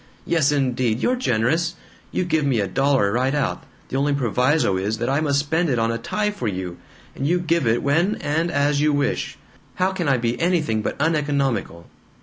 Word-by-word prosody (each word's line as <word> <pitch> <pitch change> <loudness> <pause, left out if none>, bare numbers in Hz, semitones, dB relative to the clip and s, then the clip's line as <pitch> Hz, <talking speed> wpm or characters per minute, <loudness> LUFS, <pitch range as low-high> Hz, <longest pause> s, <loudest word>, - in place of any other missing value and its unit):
Yes 160 -4 +2
indeed! 125 -5 0
You're 250 - +1
generous! 165 - 0 0.4
You 185 - -1
give 160 -3 +1
me 135 -5 +1
a 100 - +1
dollar, 135 +1 +2
right 130 +5 +1
out 145 - -2 0.2
the 135 - -2
only 140 +1 +1
proviso 125 -2 +1
is 100 +4 -1
that 120 +3 -1
I 140 - +2
must 145 -3 +1
spend 160 +4 0
it 125 - +1
on 115 0 +1
a 115 - -3
tie 210 - -1
for 130 - -4
you! 90 -3 -4 0.4
And 140 - -2
you 175 +3 +2
give 170 -5 0
it 115 +2 +1
when 165 +9 +2
and 160 +4 -1
as 145 -1 +1
you 150 0 +3
wish. 145 0 -1 0.4
How 185 +1 +1
can 180 -4 -3
I 135 - +3
be 120 +3 -2
anything 160 -11 +1
but 105 - -4
uneconomical?" 140 - 0
140 Hz, 200 wpm, -22 LUFS, 120-160 Hz, 0.4 s, you